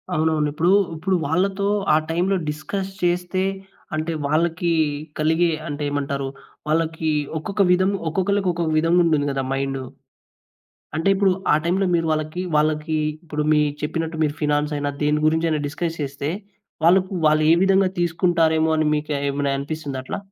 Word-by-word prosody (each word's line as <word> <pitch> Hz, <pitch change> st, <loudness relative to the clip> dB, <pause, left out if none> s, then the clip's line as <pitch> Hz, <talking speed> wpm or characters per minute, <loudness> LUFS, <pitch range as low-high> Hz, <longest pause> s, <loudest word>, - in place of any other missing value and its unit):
అవునవును. 155 Hz, -1 st, +1 dB
ఇప్పుడు, 170 Hz, +4 st, +2 dB, 0.2 s
ఇప్పుడు 185 Hz, +4 st, 0 dB
వాళ్ళతో 190 Hz, +5 st, 0 dB, 0.3 s
ఆ -, -, +6 dB
టైంలో 180 Hz, +4 st, +1 dB
డిస్కస్ 190 Hz, +6 st, -4 dB
చేస్తే, 180 Hz, +1 st, 0 dB, 0.5 s
అంటే 155 Hz, +2 st, -2 dB
వాళ్ళకి 165 Hz, +3 st, +1 dB, 0.5 s
కలిగే 160 Hz, +2 st, +2 dB, 0.2 s
అంటే 145 Hz, 0 st, -4 dB
ఏమంటారు, 140 Hz, -1 st, -2 dB, 0.4 s
వాళ్ళకి 160 Hz, 0 st, 0 dB, 0.3 s
ఒక్కొక్క 200 Hz, +5 st, -2 dB
విధం 185 Hz, +1 st, +3 dB, 0.2 s
ఒక్కొక్కళ్ళకి 190 Hz, +3 st, 0 dB
ఒక్కొక్క 170 Hz, -2 st, -2 dB
విధంగుంటుంది 165 Hz, -2 st, +3 dB
గదా! 135 Hz, -1 st, -2 dB
మైండు. 135 Hz, -1 st, -2 dB, 1.1 s
అంటే 165 Hz, +4 st, 0 dB
ఇప్పుడు 195 Hz, 0 st, +3 dB, 0.2 s
ఆ -, -, +6 dB
టైంలో 185 Hz, +3 st, +1 dB
మీరు 165 Hz, -1 st, +1 dB
వాళ్ళకి 155 Hz, +3 st, -2 dB
వాళ్ళకి 155 Hz, +1 st, +1 dB, 0.3 s
ఇప్పుడు 150 Hz, -2 st, -3 dB
మీరు 150 Hz, -1 st, +3 dB
చెప్పినట్టు 160 Hz, +2 st, -2 dB
మీరు 145 Hz, -, -1 dB
ఫినాన్సైనా 145 Hz, -1 st, 0 dB
దేని 150 Hz, +1 st, +2 dB
గురించి 160 Hz, +1 st, +2 dB
అయినా 155 Hz, -1 st, 0 dB
డిస్కస్ 165 Hz, +2 st, -3 dB
చేస్తే 140 Hz, 0 st, -4 dB, 0.6 s
వాళ్ళకు 185 Hz, +3 st, +4 dB
వాళ్ళు 155 Hz, 0 st, +4 dB
ఏ -, -, +7 dB
విధంగా 195 Hz, 0 st, +4 dB
తీసుకుంటారేమో 165 Hz, -2 st, +2 dB
అని 155 Hz, -1 st, +1 dB
మీకు 150 Hz, 0 st, -2 dB, 0.2 s
ఏమైనా 140 Hz, 0 st, -1 dB
అనిపిస్తుందా 140 Hz, -1 st, -5 dB
అట్లా? -, -, -4 dB
160 Hz, 140 wpm, -22 LUFS, 150-175 Hz, 1.1 s, ఏ